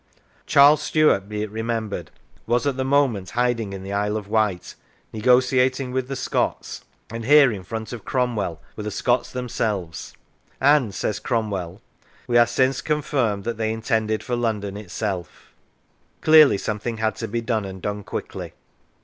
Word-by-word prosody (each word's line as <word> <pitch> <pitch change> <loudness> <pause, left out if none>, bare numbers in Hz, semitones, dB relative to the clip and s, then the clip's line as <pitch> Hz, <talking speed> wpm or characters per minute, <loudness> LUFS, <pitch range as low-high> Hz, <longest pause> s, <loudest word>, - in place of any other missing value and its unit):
Charles 145 +2 +6
Stuart, 150 -11 +2
be 105 0 -3
it 105 - -6
remembered, 110 -6 -3 0.4
was 120 +2 +1
at 140 -2 0
the 130 - -1
moment 130 -8 +1
hiding 120 -4 0
in 95 -1 -7
the 100 +1 -5
Isle 105 +1 0
of 105 -2 -7
Wight, 105 -4 0 0.4
negotiating 125 +3 +2
with 130 0 -2
the 135 - -4
Scots, 130 - -2 0.3
and 115 0 -5
here 140 +1 +6
in 100 -3 -5
front 110 +4 -6
of 115 -5 -7
Cromwell 115 -10 -1 0.2
were - - -6
the 105 - -3
Scots 120 +4 0
them 125 -1 -4
selves, 95 -9 -3 0.4
and 135 -7 +3
(says 105 - -2
Cromwell) 100 -7 -3 0.2
" - - -31
we 120 - -1
are 120 - +6
since 130 +2 +1
confirmed 135 -9 -1
that 115 0 -3
they 110 -1 -1
intended 110 -1 -1
for 125 - -2
London 105 -4 -2
itself." 100 -3 -5 0.7
Clearly 155 -7 +7
something 105 +3 -3
had 110 0 0
to 115 - -4
be 115 +3 -2
done, 115 -2 -1
and 95 -1 -7
done 105 +2 -4
quickly. - - -6
115 Hz, 165 wpm, -23 LUFS, 105-125 Hz, 0.7 s, Clearly